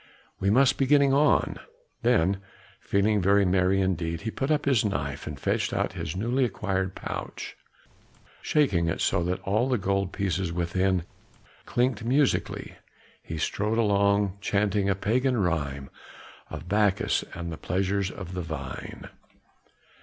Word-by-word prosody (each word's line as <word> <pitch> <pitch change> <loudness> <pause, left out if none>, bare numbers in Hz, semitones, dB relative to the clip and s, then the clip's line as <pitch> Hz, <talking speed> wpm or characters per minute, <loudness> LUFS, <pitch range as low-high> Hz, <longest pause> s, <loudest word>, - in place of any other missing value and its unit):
We 100 - +1
must 130 +4 +4
be 135 - +2
getting 140 -1 +5
on." 145 +1 +3 0.4
Then 95 +4 +2 0.4
feeling 100 +1 +1
very 100 +2 +4
merry 95 +1 +2
indeed, 85 -3 -1
he 110 +2 -3
put 135 +5 -3
up 150 -1 +1
his 135 -6 +3
knife 70 -9 -3
and - - -6
fetched - - 0
out - - -1
his 75 - -5
newly 120 +7 0
acquired 95 -4 -1
pouch; - - -6 0.9
shaking 100 - +2
it 80 - -1
so 85 - +1
that 90 +2 -1
all 110 +6 +1
the 125 - +2
gold 100 -1 -1
pieces 95 -2 -1
within 90 +1 0 0.6
clinked 120 -2 0
musically, 135 +4 0 0.4
he 80 - -6
strode 105 +7 -1
along, 100 -2 +2
chanting 100 -1 +1
a 100 - +2
pagan 125 +6 +1
rhyme 70 -8 -1 0.6
of - - -8
Bacchus 100 0 +2
and 85 -1 -5
the 80 - -6
pleasures 95 +2 -1
of 95 -2 -8
the 90 - -3
vine. 80 -6 -7
100 Hz, 145 wpm, -27 LUFS, 90-110 Hz, 0.9 s, getting